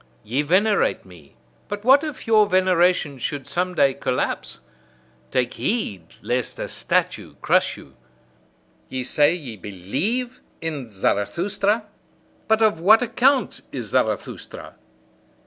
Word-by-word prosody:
Ye 125 Hz, +7 st, 0 dB
venerate 195 Hz, +7 st, +2 dB
me; 85 Hz, -6 st, -17 dB, 0.3 s
but 205 Hz, 0 st, -5 dB
what 270 Hz, +3 st, +6 dB
if 305 Hz, -4 st, -6 dB
your 215 Hz, -2 st, +5 dB
veneration 180 Hz, -6 st, +2 dB
should 145 Hz, +1 st, -4 dB
some 180 Hz, +1 st, -2 dB
day 135 Hz, -4 st, +4 dB
collapse? 125 Hz, -1 st, -2 dB, 0.7 s
Take 125 Hz, -1 st, 0 dB
heed 200 Hz, -, -2 dB, 0.2 s
lest 120 Hz, +2 st, -2 dB
a -, -, -4 dB
statue -, -, -1 dB
crush -, -, +2 dB
you! -, -, -15 dB, 0.9 s
Ye 130 Hz, -1 st, -3 dB
say, 145 Hz, +5 st, +3 dB
ye 130 Hz, -10 st, -8 dB
believe 145 Hz, -, -3 dB, 0.2 s
in 145 Hz, -8 st, -5 dB
Zarathustra? 175 Hz, -, 0 dB, 0.6 s
But 220 Hz, 0 st, +3 dB
of 210 Hz, -7 st, +3 dB
what 215 Hz, +8 st, +6 dB
account 260 Hz, +3 st, +1 dB
is -, -, -5 dB
Zarathustra! -, -, -2 dB
170 Hz, 120 wpm, -22 LUFS, -, 0.9 s, what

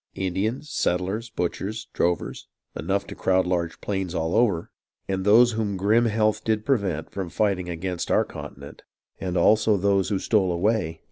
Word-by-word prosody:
Indians, 105 Hz, +10 st, -2 dB
settlers, 95 Hz, +6 st, -1 dB
butchers, 105 Hz, +3 st, -3 dB
drovers,. 85 Hz, 0 st, -1 dB, 0.3 s
Enough 100 Hz, +5 st, -1 dB
to -, -, -8 dB
crowd 95 Hz, 0 st, +1 dB
large 85 Hz, -2 st, -1 dB
plains 95 Hz, -3 st, -3 dB
all 80 Hz, 0 st, -1 dB
over. 100 Hz, -9 st, +2 dB, 0.4 s
And 95 Hz, -1 st, -1 dB
those 115 Hz, +4 st, +6 dB
whom 110 Hz, -3 st, -2 dB
grim 110 Hz, +5 st, +3 dB
health 110 Hz, -1 st, +1 dB
did 110 Hz, -1 st, 0 dB
prevent 100 Hz, -, 0 dB
From 95 Hz, -3 st, -4 dB
fighting 95 Hz, -3 st, 0 dB
against 85 Hz, +1 st, -3 dB
our -, -, +3 dB
continent;. -, -, -10 dB, 0.4 s
And 90 Hz, -1 st, -2 dB
also 110 Hz, -1 st, +4 dB
those 100 Hz, 0 st, +2 dB
who 100 Hz, -, +1 dB
stole 95 Hz, -2 st, +2 dB
away. 85 Hz, -2 st, 0 dB
100 Hz, 155 wpm, -25 LUFS, 90-110 Hz, 0.4 s, those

